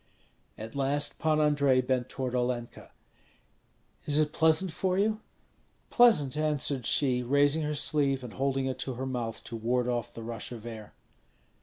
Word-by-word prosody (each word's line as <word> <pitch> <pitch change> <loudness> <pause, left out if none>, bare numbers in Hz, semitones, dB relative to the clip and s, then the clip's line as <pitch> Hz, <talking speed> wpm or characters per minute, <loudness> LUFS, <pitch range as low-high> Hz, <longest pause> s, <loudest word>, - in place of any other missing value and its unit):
At 110 +1 -8
last 140 +1 0
Pan 155 -1 +2
Andrei 145 -3 +3
bent 130 -1 -1
toward 130 -2 -4
Olenka. 125 -1 -3 1.2
"Is 145 0 +2
it 155 -1 +1
pleasant 160 +3 +3
for 185 +2 -1
you?" 215 +2 +1 0.7
"Pleasant," 200 - +4
answered 145 -4 -1
she, 130 -4 +2
raising 145 +5 +2
her 150 0 -2
sleeve 140 -3 +1
and 120 -4 -8
holding 135 0 -1
it 130 -1 -3
to 130 - -4
her 130 +2 -4
mouth 120 -4 -4
to 115 - -7
ward 120 +2 0
off 120 -1 -2
the 115 - -7
rush 115 +1 -6
of 115 -2 -8
air. 110 -3 -9
135 Hz, 160 wpm, -29 LUFS, 125-150 Hz, 1.2 s, Pleasant